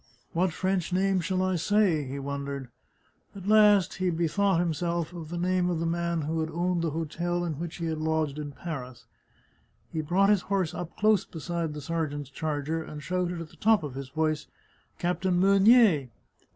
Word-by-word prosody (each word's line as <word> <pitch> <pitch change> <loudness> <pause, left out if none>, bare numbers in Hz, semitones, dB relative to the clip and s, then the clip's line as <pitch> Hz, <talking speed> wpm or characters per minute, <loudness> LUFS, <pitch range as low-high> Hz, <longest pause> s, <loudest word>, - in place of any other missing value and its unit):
" - - -38
What 180 +2 +2
French 185 0 -1
name 190 +1 +2
shall 185 +2 0
I 185 -1 +1
say? 185 -3 +2
" - - -7
he 135 +2 -5
wondered. 140 -1 -4 0.7
At 190 -2 -9
last 210 -3 +5
he 185 -1 +1
bethought 175 +3 +1
him 175 -1 +1
of 170 -1 -3
the 175 - -4
name 180 0 +1
of 170 -2 -1
the 165 - -1
man 170 0 -1
who 160 +2 -2
had 160 0 -1
owned 175 +2 0
the 165 - 0
hotel 170 +3 -2
in 155 -4 -4
which 170 -1 -5
he 170 - -4
had 160 -1 -2
lodged 155 -2 -1
in 145 -1 -5
Paris. 135 -5 -7 0.9
He 160 - -1
brought 185 +6 +2
his 205 -3 +3
horse 190 -4 0
up 175 -1 -6
close 210 -2 +4
beside 165 -1 -4
the 150 - -6
sergeant's 145 -3 -3
charger, 155 +2 -2
and 150 -2 -8
shouted 180 +1 -2
at 165 - -8
the - - -19
top 220 -4 +3
of 145 -4 -5
his 135 0 -6
voice: 155 +1 -1 0.3
" - - -37
Captain 180 +1 0
Meunier." 195 - +5
170 Hz, 195 wpm, -28 LUFS, 155-185 Hz, 0.9 s, last